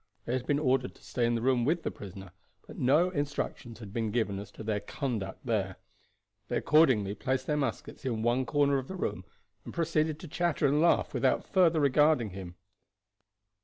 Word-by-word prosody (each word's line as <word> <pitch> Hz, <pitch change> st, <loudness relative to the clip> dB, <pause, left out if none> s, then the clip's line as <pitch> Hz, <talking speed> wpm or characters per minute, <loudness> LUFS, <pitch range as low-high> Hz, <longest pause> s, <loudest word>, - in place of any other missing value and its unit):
They 120 Hz, -, -2 dB
had 130 Hz, -1 st, -2 dB
been 145 Hz, -, +2 dB
ordered 130 Hz, -3 st, +1 dB
to -, -, -21 dB
stay 120 Hz, -2 st, 0 dB
in 120 Hz, -, +1 dB
the 115 Hz, -, -2 dB
room 125 Hz, -2 st, +3 dB
with 165 Hz, +6 st, +1 dB
the -, -, -2 dB
prisoner, 95 Hz, -2 st, -10 dB, 0.3 s
but -, -, -11 dB
no 150 Hz, +8 st, +3 dB
instructions 145 Hz, -6 st, -3 dB
had 105 Hz, -4 st, -10 dB
been 115 Hz, -1 st, -1 dB
given 105 Hz, -3 st, -1 dB
as 100 Hz, -, -8 dB
to -, -, -9 dB
their 105 Hz, -1 st, -1 dB
conduct 110 Hz, -7 st, -4 dB
there. 100 Hz, -6 st, -1 dB, 0.7 s
They -, -, -1 dB
accordingly 130 Hz, -11 st, +4 dB
placed 130 Hz, +3 st, -2 dB
their 150 Hz, -, 0 dB
muskets 135 Hz, -6 st, -3 dB
in 115 Hz, -5 st, -2 dB
one 120 Hz, +2 st, +1 dB
corner 140 Hz, -1 st, +2 dB
of 130 Hz, -, -7 dB
the 190 Hz, -, -6 dB
room, 95 Hz, -, -3 dB, 0.4 s
and -, -, -8 dB
proceeded 155 Hz, -2 st, 0 dB
to 175 Hz, -, -9 dB
chatter 165 Hz, 0 st, 0 dB
and 145 Hz, +2 st, +3 dB
laugh 170 Hz, -, +3 dB
without -, -, +1 dB
further 170 Hz, -5 st, +3 dB
regarding 145 Hz, -5 st, +3 dB
him. 90 Hz, -2 st, -8 dB
130 Hz, 195 wpm, -30 LUFS, 110-150 Hz, 0.7 s, accordingly